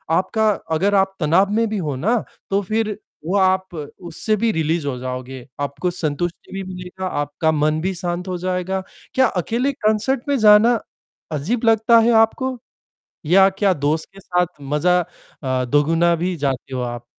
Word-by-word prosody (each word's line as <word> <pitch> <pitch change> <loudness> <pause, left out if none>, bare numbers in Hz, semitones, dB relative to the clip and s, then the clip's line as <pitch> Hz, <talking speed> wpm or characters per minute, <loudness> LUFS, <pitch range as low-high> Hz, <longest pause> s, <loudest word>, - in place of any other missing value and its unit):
आपका 220 +4 +1 0.3
अगर 200 +5 +2
आप 195 0 +2
तनाव 175 +6 +3
में 225 +1 +2
भी 215 - -2
हो 150 -7 -2
ना, 220 - 0 0.3
तो 200 +1 +1
फिर 215 +1 -1 0.3
वो 185 +5 +1
आप 190 -1 +2
उससे 170 +7 -3
भी 230 -1 +3
रिलीज़ 160 -2 -1
हो 130 -2 -2
जाओगे, 130 0 -6
आपको 145 +5 -2
संतुष्टि 170 0 -3
भी 195 0 -4
मिलेगा, 180 +1 -7
आपका 145 +1 -1
मन 155 0 +1
भी 190 +2 -1
शांत 175 +1 -3
हो 180 -1 -2
जाएगा। 185 +1 -2 0.3
क्या 260 - +4
अकेले 235 - -1
कॉन्सर्ट 220 +3 0
में 280 - +2
जाना 215 +2 +6 0.5
अजीब 190 - -2
लगता 225 +1 +5
है 230 +1 +4
आपको 255 +3 0 0.7
या 190 +5 +6
क्या 195 0 +1
दोस्त 150 +2 -1
के 195 - -13
साथ 180 -2 0
मजा 150 +6 +2 0.4
अ, 130 -1 0
दोगुना 165 +5 +3
भी 175 +2 -2
जाते 135 -2 -2
हो 125 - -2
आप? 120 -1 -5
180 Hz, 170 wpm, -20 LUFS, 150-210 Hz, 0.7 s, जाना